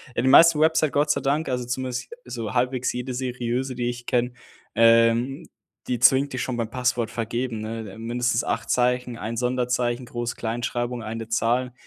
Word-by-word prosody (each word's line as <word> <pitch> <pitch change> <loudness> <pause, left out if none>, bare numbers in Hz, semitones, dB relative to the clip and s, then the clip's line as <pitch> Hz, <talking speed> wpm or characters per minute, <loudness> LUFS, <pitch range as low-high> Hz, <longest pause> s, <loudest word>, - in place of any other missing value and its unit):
ja - - +1
die - - +2
meisten 165 +3 +7
Website, 160 -2 +3
Gott 150 +1 +2
sei - - +1
Dank 145 +2 0
also 125 -1 -2
zumindest 125 0 -4
so 115 -3 -5
halbwegs 125 +1 0
jede 125 +1 -4
seriöse, 125 0 -2
die 120 0 -1
ich 120 0 -6
kenne, 125 -1 0 0.4
ähm, 115 +3 +4 0.4
die 125 -2 -1
zwingt 135 +3 +5
dich 130 - -3
schon 125 -2 -3
beim 115 -2 -2
Passwort 125 -2 -1
vergeben, 120 0 -3
ne, 110 -1 -5
äh, - - -12
mindestens 120 +1 -1
8 115 - -2
Zeichen, 125 -1 +1
ein 115 +2 -4
Sonderzeichen, 125 0 -1
Groß 120 0 -4
Kleinschreibung, 120 +1 -3
eine 110 0 -5
Zahl, 120 +3 0
125 Hz, 175 wpm, -24 LUFS, 115-130 Hz, 0.4 s, meisten